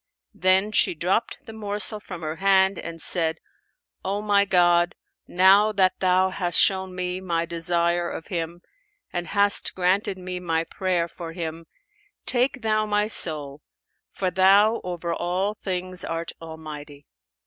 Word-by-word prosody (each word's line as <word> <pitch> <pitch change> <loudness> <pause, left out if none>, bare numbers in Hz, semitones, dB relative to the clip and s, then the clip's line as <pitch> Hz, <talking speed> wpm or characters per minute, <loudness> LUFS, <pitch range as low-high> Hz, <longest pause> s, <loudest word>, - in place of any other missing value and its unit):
Then 190 +3 +2
she 215 - +2
dropped 180 +8 -2
the 225 - -10
morsel 210 0 +2
from 180 -5 -9
her 155 +1 -4
hand 195 0 +3
and 165 0 -7
said, 165 0 +1 0.7
'O 200 +2 -2
my 200 -1 +3
God, 175 -2 +3 0.3
now 195 +4 +5
that 190 -2 +2
Thou 185 0 +2
hast 175 -2 0
shown 190 -1 +2
me 180 0 -3
my 170 -2 -1
desire 170 +1 +1
of 165 - -7
him 170 -1 -5 0.5
and 175 -1 -3
hast 205 0 +1
granted 190 +1 0
me 180 0 -6
my 165 -2 -1
prayer 180 -1 -1
for 165 -1 -9
him, 165 -1 -6 0.6
take 255 +1 +1
Thou 215 -1 +1
my 210 0 +1
soul, 150 -8 -1 0.5
for 185 -2 -2
Thou 200 +5 +4
over 175 -1 -4
all 185 +4 -1
things 185 -3 -4
art 165 0 -4
Almighty!' 150 -3 -10
180 Hz, 145 wpm, -24 LUFS, 170-195 Hz, 0.7 s, now